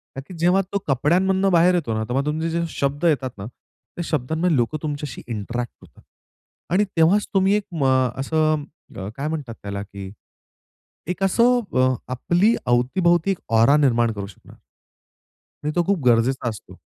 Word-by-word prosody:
का 135 - -5
की - - -10
जेव्हा 180 +4 +3
तो - - +2
कपड्यांमधून 185 +8 +2
बाहेर 175 +1 +4
येतो 160 -10 -1
ना, 110 0 -1
तेव्हा 125 +5 -1
तुमचे 160 +2 -1
जे 170 +1 -1
शब्द 140 +1 -2
येतात 140 -5 +2
ना, 100 - -7
त्या 130 +8 -11
शब्दांमध्ये 160 +4 0
लोकं 120 +5 0
तुमच्याशी 145 -4 -5
इंटरॅक्ट 120 +2 -4
होतात. - - -19 0.7
आणि 200 +3 +4
तेव्हाच 175 +6 +4
तुम्ही 195 0 +3
म - - +4
एक 185 -8 -4
अ, 130 -1 +1
असं 155 +1 +1 0.3
अ, 95 - -5
काय 140 +2 -3
म्हणतात 145 -7 -4
त्याला? 100 0 -4
की 100 -1 -9 1.0
एक 180 +2 -3
असं 240 +6 +3 0.2
अ, 130 0 +3 0.2
आपल्या 175 - +2 0.2
अवती-भोवती 170 +9 +2
एक 190 - -1 0.2
औरा 115 +6 +5
निर्माण 120 -6 +2
करू 100 -2 -6
शकणार. 100 - -16 1.1
आणि 150 - -1
तो 175 - +3
खूप 190 -8 0
गरजेचा 120 +1 +2
असतो. 110 - -10
150 Hz, 165 wpm, -22 LUFS, 120-175 Hz, 1.1 s, औरा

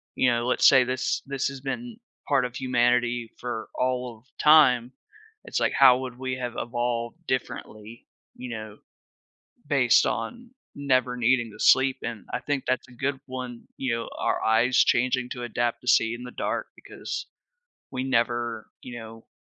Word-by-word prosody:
you 125 - +3
know, 120 0 0
let's 125 - +4
say 130 -2 +7
this 130 +1 -1
this 135 -1 -2
has 140 -1 -6
been 230 - -5 0.3
part 135 -3 +2
of 125 0 -6
humanity 120 -2 +1
for 120 -2 -5
all 125 -2 -1
of 115 - -31
time. 130 -6 +5 0.5
It's - - -2
like, - - +1
how 130 -2 +7
would 125 -2 -6
we 130 -1 -3
have 125 -2 -5
evolved 120 +2 -2
differently, 115 -3 -5 0.3
you 125 0 -8
know, 110 -2 -7 0.9
based 135 -4 +4
on 235 - -4 0.2
never 130 -3 +1
needing 120 -1 +2
to - - -14
sleep 130 0 +5
and 115 -5 -6
I - - -1
think 145 -2 -2
that's 130 +1 0
a 125 - -16
good 135 +3 -2
one, 125 -2 -6 0.2
you 125 -3 -1
know, 115 - -4
our - - 0
eyes 115 +3 +3
changing 125 +1 +2
to 125 - -6
adapt 120 0 -1
to 125 - -18
see 115 -3 +4
in 120 - -8
the 125 - -7
dark - - -3
because, - - -6 0.7
we 130 -1 -3
never 120 -3 -1
you 120 -1 -8
know, 115 0 -11
125 Hz, 170 wpm, -26 LUFS, 120-130 Hz, 0.9 s, say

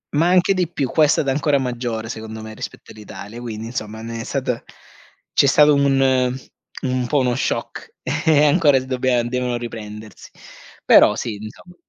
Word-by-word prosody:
Ma 160 +4 +3
anche 185 +2 +4
di 180 -3 -1
più, 140 -6 -2
qua 155 - +4
è - - +2
stata 140 -2 +1
ancora 145 +1 +1
maggiore, 120 -3 -3
secondo 110 -1 -7
me, 110 0 -8
rispetto - - -9
all'Italia, 105 +1 -10
quindi 110 -2 -6
insomma 110 -2 -6
ne 115 0 -5
è - - -5
stata 125 -2 -3 0.7
c'è 140 - +4
stato 150 +2 +5
un 135 -3 +2 0.5
un 130 -2 -1
po' 145 +3 +1
uno 125 -2 +1
shock - - -4
e 150 -2 +2
ancora 145 -2 +4
s 130 - -8
dobbia 130 -2 0
devono 125 0 -2
riprendersi. 110 -3 -9 0.6
Però - - +6
sì, 115 -3 -4
insomma. 110 +12 -11
125 Hz, 170 wpm, -20 LUFS, 115-140 Hz, 0.7 s, Però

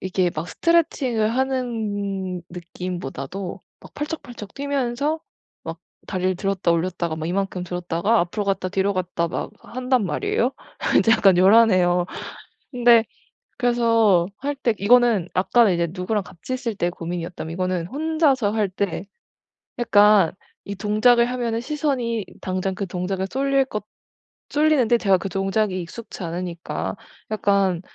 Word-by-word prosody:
이게 185 -1 0
막 155 +3 -4
스트레칭을 260 -10 +1
하는 205 -8 -2
느낌보다도 180 0 -6 0.2
막 - - -15
팔짝팔짝 265 -9 -6
뛰면서 280 +2 -1 0.4
막 165 0 -6 0.3
다리를 185 -1 -1
들었다 195 -2 0
올렸다가 170 -1 -1
막 160 0 -4
이만큼 190 0 -2
들었다가 180 +4 0
앞으로 190 +4 -2
갔다 195 -1 -1
뒤로 195 +1 +1
갔다 180 -2 -1
막 - - -4
한단 250 -2 -1
말이에요. 415 - 0 0.4
인제 225 - +4
약간 195 -5 +5
요란해요. 185 -3 +5 0.6
근데 240 -3 +5 0.5
그래서 230 -7 +3
할 285 +1 -2
때 240 -5 0
이거는 225 -3 +4
아까는 200 +1 +4
이제 170 0 +1
누구랑 195 +4 -2
같이 200 +8 -7
있을 245 -3 -3
때 175 -3 0
고민이었다면 170 -1 -5
이거는 180 -1 -1
혼자서 290 - +1
할 215 -2 +1
때 190 -1 -2 0.8
약간 210 -6 +5 0.3
이 200 - -5
동작을 215 +4 +4
하면은 235 -2 -1
시선이 255 -7 -1 0.2
당장 185 0 -2
그 200 - -3
동작에 185 +2 -2
쏠릴 275 +2 +1
것 210 -5 -5 0.6
쏠리는데 290 -6 +3
제가 195 -4 +4
그 195 - -5
동작이 195 +1 0
익숙지 190 +3 -8
않으니까 170 0 -4 0.4
약간 200 -4 +1
200 Hz, 305 characters per minute, -23 LUFS, 180-240 Hz, 0.8 s, 약간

